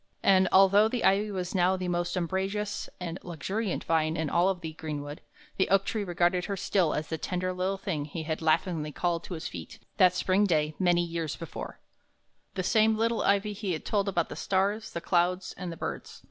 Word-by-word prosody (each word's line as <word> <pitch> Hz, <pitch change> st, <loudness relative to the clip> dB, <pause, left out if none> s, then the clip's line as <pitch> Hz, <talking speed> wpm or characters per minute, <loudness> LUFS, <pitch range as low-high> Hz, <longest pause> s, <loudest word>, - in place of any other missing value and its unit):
And, 190 Hz, -1 st, +5 dB
although 195 Hz, +2 st, +6 dB
the 240 Hz, +1 st, -2 dB
ivy 205 Hz, +2 st, +3 dB
was 185 Hz, -3 st, -4 dB
now 185 Hz, 0 st, +3 dB
the 185 Hz, -1 st, -3 dB
most 175 Hz, +1 st, -1 dB
umbrageous 190 Hz, +4 st, -2 dB
and 175 Hz, -1 st, -5 dB
luxuriant 185 Hz, +5 st, -3 dB
vine 160 Hz, -1 st, +1 dB
in 160 Hz, -2 st, -2 dB
all 175 Hz, +3 st, +3 dB
the 165 Hz, -3 st, -7 dB
greenwood, 150 Hz, -2 st, -6 dB, 0.4 s
the 190 Hz, -, +2 dB
oak 195 Hz, 0 st, +3 dB
tree 215 Hz, -2 st, -2 dB
regarded 175 Hz, 0 st, +1 dB
her 200 Hz, -1 st, -3 dB
still 180 Hz, -3 st, +1 dB
as 150 Hz, 0 st, -3 dB
the 160 Hz, -, -3 dB
tender 185 Hz, +2 st, -2 dB
little 185 Hz, +2 st, -1 dB
thing 170 Hz, -7 st, -3 dB
he 160 Hz, +2 st, -5 dB
had 160 Hz, +1 st, -3 dB
laughingly 160 Hz, -1 st, +1 dB
called 170 Hz, +2 st, -1 dB
to 180 Hz, -, -5 dB
his 160 Hz, -, -5 dB
feet 85 Hz, -2 st, -8 dB, 0.2 s
that 180 Hz, -1 st, +5 dB
spring 190 Hz, +3 st, +2 dB
day, 155 Hz, -3 st, +1 dB
many 175 Hz, -2 st, +3 dB
years 165 Hz, -2 st, -3 dB
before, 165 Hz, -, -7 dB, 0.8 s
the 185 Hz, -, -1 dB
same 220 Hz, +2 st, +3 dB
little 230 Hz, +1 st, +1 dB
ivy 200 Hz, +1 st, +2 dB
he 200 Hz, -2 st, -3 dB
had 155 Hz, -, -5 dB
told 200 Hz, -2 st, +1 dB
about 175 Hz, -3 st, 0 dB
the -, -, -6 dB
stars, 200 Hz, +3 st, 0 dB
the 170 Hz, -, -5 dB
clouds, 180 Hz, +1 st, +1 dB
and 180 Hz, -1 st, -5 dB
the 165 Hz, -, -8 dB
birds. 70 Hz, -, -6 dB
180 Hz, 200 wpm, -28 LUFS, 165-195 Hz, 0.8 s, although